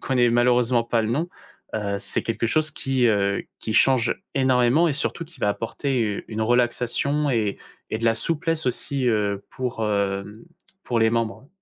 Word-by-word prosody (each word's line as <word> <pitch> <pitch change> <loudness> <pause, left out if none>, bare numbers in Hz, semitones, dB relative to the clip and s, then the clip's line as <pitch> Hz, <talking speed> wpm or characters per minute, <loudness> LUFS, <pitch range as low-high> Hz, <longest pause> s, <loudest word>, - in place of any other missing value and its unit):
connais 125 -3 +2
malheureusement 120 0 +3
pas 115 -1 +1
le 110 - -2
nom, 155 +8 -1 0.5
heu, 100 -2 -1
c'est - - +1
quelque 115 0 -1
chose 155 +5 +2
qui, 135 -3 -1
heu, 100 -2 +1
qui 110 - -4
change 130 -1 +3 0.2
énormément 130 +4 +3
et 150 - 0
surtout 150 +3 -2
qui 165 +1 -17
va 105 - +2
apporter 115 0 -2
une 110 0 -3
relaxation 125 +5 +1
et 110 -5 0 0.3
et 110 - 0
de 115 - -4
la 115 - +4
souplesse 165 +5 -1
aussi, 130 +1 -1
heu, 100 -3 0
pour, 125 -3 -3
hem, 100 +1 -2 0.4
pour 120 -2 0
les 110 0 +4
membres. 115 +4 -2
120 Hz, 170 wpm, -23 LUFS, 110-135 Hz, 0.5 s, la